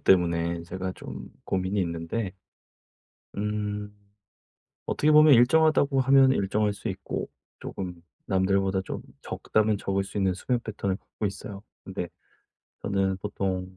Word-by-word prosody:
때문에 85 -2 +3
제가 95 +2 -4
좀 - - -8 0.2
고민이 95 +2 0
있는데 85 +4 -3 1.0
음 105 0 -2 0.9
어떻게 150 - +2
보면 150 -2 +8
일정하다고 140 +2 +4
하면 135 0 +6
일정할 105 -1 +1
수 100 +3 -5
있고 95 -1 -4 0.3
쪼금 90 -3 -6 0.2
남들보다 95 0 +2
좀 - - -5 0.2
적다면 110 -1 +1
적을 100 -1 -1
수 100 - -5
있는 95 -2 +2
수면 120 +6 -1
패턴을 100 -3 -2
갖고 105 - -5
있어요. 100 0 -6 0.2
근데 95 -2 -4 0.7
저는 95 -1 +1
보통 95 -2 -3
100 Hz, 270 characters per minute, -27 LUFS, 95-110 Hz, 1.0 s, 보면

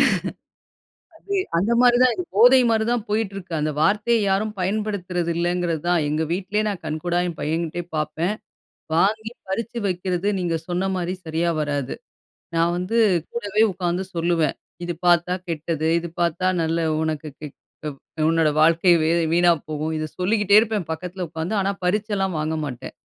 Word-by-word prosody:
முடியாதுங்க. - - +4 1.0
அது, 400 +5 -7 0.2
அந்த 195 +7 +1
மாதிரி 245 -1 +6
தான் 255 -1 +4
இது. 365 - -3
போதை 245 +5 +7
மாரி 220 -1 +2
தான் 240 -3 0
போயிட்டு 210 -1 0
இருக்கு. 185 -3 -7
அந்த 155 0 0
வார்த்தைய 210 +6 +3
யாரும் 210 +3 0
பயன்படுத்துறது 185 -3 -1
இல்லைங்கிறது 175 -2 0
தான். 175 -1 +3
எங்க 155 +2 0
வீட்டிலயே 200 +3 -1
நான் 195 -4 -4
கண்கூடா 160 +3 -1
என் 170 -3 -5
பையன்கிட்டயே 165 +2 -2
பார்ப்பேன். 160 +5 -1 0.6
வாங்கி 220 +6 +1 0.2
பறித்து 230 +4 -3
வைக்கிறது, 180 0 -1
நீங்க 175 -2 0
சொன்ன 180 +2 -1
மாதிரி 180 0 -2
சரியாக 165 +1 0
வராது. 145 -3 -2 0.6
நான் 165 +1 +2
வந்து 185 +6 -2 0.4
கூடவே 215 -2 0
உட்காந்து 180 0 -2
சொல்லுவேன். 165 -2 +1 0.3
இது 175 - -2
பார்த்தா 175 0 +4 0.2
கெட்டது. 160 -1 -2
இது 170 0 -5
பார்த்தா, 170 +2 +1 0.2
நல்ல 165 +1 0 0.2
உனக்கு 155 -1 -2
க் 150 -1 -7 0.4
உ - - -2 0.4
உன்னோட 165 -1 +3
வாழ்க்கை 165 +3 +4
வி 155 - +2 0.2
வீணா 175 +1 +5 0.2
போகும். 155 +1 -2
இதை 155 - -2
சொல்லிக்கிட்டே 205 +2 +4
இருப்பேன், 215 -5 -2
பக்கத்தில 180 +3 -5
உட்காந்து. 160 +5 -3
ஆனா, 195 0 +1
பறிச்செல்லாம் 195 -1 0
வாங்க 155 +1 -1
மாட்டேன். 125 -5 -7
175 Hz, 155 wpm, -23 LUFS, 165-205 Hz, 1.0 s, போதை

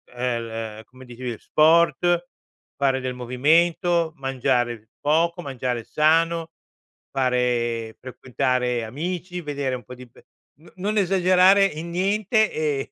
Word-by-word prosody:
uhm, 125 - -6 0.6
l - - -11
come 130 +2 -16
dicevi, 120 -1 -6
sport, 170 +2 +3 0.5
fare 135 -1 +1
del 130 0 -3
movimento, 160 +7 +2
mangiare 125 -4 -1
poco, 165 +4 +1
mangiare 125 -3 -3
sano, 165 +1 +1 0.6
fare 120 -3 -1
frequentare 125 -1 -2
amici, 175 +8 -5
vedere 140 -4 -3
un 125 - -9
po' 125 - -10
di 125 0 -12
pe - - -21 0.4
n 170 - -17
non 210 +3 -2
esagerare 185 +1 +4
in 165 -2 -4
niente, 210 +4 +1
e 150 -3 -2
145 Hz, 120 wpm, -23 LUFS, 125-175 Hz, 0.6 s, esagerare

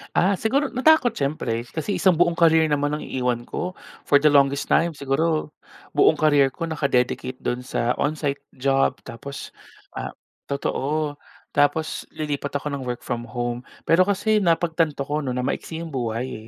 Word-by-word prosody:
Ah, 190 +1 +3
siguro 270 +6 +1
natakot 260 -1 +4
siyempre. 130 - -2
Kasi 165 +9 -3
isang 185 -3 +4
buong 170 0 +2
career 160 -2 +5
naman 145 +1 +1
ang 150 - -6
iiwan 125 -2 -1
ko. 180 +8 -4 0.3
For - - +4
the 150 +1 +5
longest 140 0 +3
time 170 -1 +3
siguro, 150 +3 0 0.4
buong - - +4
career 145 -3 +4
ko 165 - -5
naka-dedicate 130 -5 0
do'n 125 - -1
sa 125 -1 -1
on-site 145 -1 -1 0.2
job 135 +1 +2
tapos 140 +4 -8 0.4
ah - - -6 0.3
totoo. 145 +1 -2 0.3
Tapos 145 +2 +1
lilipat 145 -2 -2
ako 145 +1 -2
ng 135 -3 -4
work 120 -1 -4
from 120 -1 -4
home. 120 0 -3 0.2
Pero 180 +3 +4
kasi 210 +2 +2
napagtanto 165 -4 +1
ko 150 +2 -2
'no, 130 -4 -3
na 125 - -1
maiksi 160 +5 -3
yung 165 - -7
buhay 115 -2 -3
145 Hz, 160 wpm, -23 LUFS, 130-165 Hz, 0.4 s, career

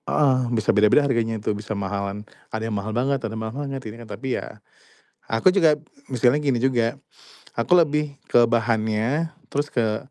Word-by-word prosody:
Heeh. 140 -4 +3
Bisa 110 -3 +1
beda-beda 105 +7 +5
harganya 115 -4 0
tuh 105 0 -1
bisa 105 +1 -5
mahalan, 100 +1 -3 0.2
ada 110 0 -4
yang 115 - -3
mahal 100 +1 -3
banget 135 +2 +1
atau 110 -1 -4
mahal 110 0 -4 0.2
banget 135 -1 -4
ini 110 +2 -8
tapi 125 +5 -4
ya, - - -9 0.7
aku 115 +10 +2
juga 165 -6 +4 0.3
misalnya 125 +1 +3
gini 135 -4 +2
juga, 120 -3 +1 0.6
aku 115 +9 +2
lebih 150 -4 +3 0.2
ke 120 -1 +6
bahannya 115 +6 0 0.2
terus 145 +1 -2
ke 110 -3 +1
115 Hz, 165 wpm, -23 LUFS, 110-140 Hz, 0.7 s, ke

